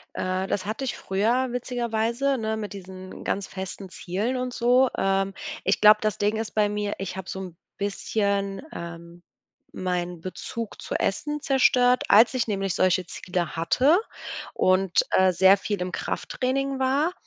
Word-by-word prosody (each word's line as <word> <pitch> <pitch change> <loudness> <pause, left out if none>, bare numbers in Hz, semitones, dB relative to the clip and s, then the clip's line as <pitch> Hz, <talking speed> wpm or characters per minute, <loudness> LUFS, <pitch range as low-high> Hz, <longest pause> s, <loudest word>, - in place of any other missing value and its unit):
Äh, 185 +1 -1
das 195 - -2
hatte 220 +6 -3
ich 260 - -3
früher 230 +7 +1
witzigerweise, 240 +2 -1
ne, 220 -1 -2
mit 210 -1 -5
diesen 185 -1 -9
ganz 200 0 -1
festen 190 0 -7
Zielen 200 +8 -3
und 250 0 -3
so. 250 +2 +4
Ähm, 195 0 +1 0.3
ich 195 - +1
glaube, 210 0 +8
das 215 -2 -1
Ding 205 +1 +1
ist 220 -1 -4
bei 210 -1 +3
mir, 210 0 -2
ich 190 -1 -5
habe 190 -1 -7
so 190 - -5
'n 180 -3 -8 0.2
bisschen, 200 0 -1
ähm, 170 0 -9 0.5
meinen 180 -2 -3
Bezug 220 +4 -6
zu - - -5
Essen 295 +9 -1
zerstört, 250 -3 +4
als 220 +3 +7
ich 240 -3 0
nämlich 195 -3 -1
solche 185 -1 +2
Ziele 180 -2 -3
hatte 260 - +3 0.6
und, 185 -1 +3
äh, 190 0 +4
sehr 190 +3 +6
viel 205 -2 -3
im 180 0 -3
Krafttraining 270 +1 -2
war 275 +6 +1
205 Hz, 160 wpm, -25 LUFS, 185-245 Hz, 0.6 s, glaube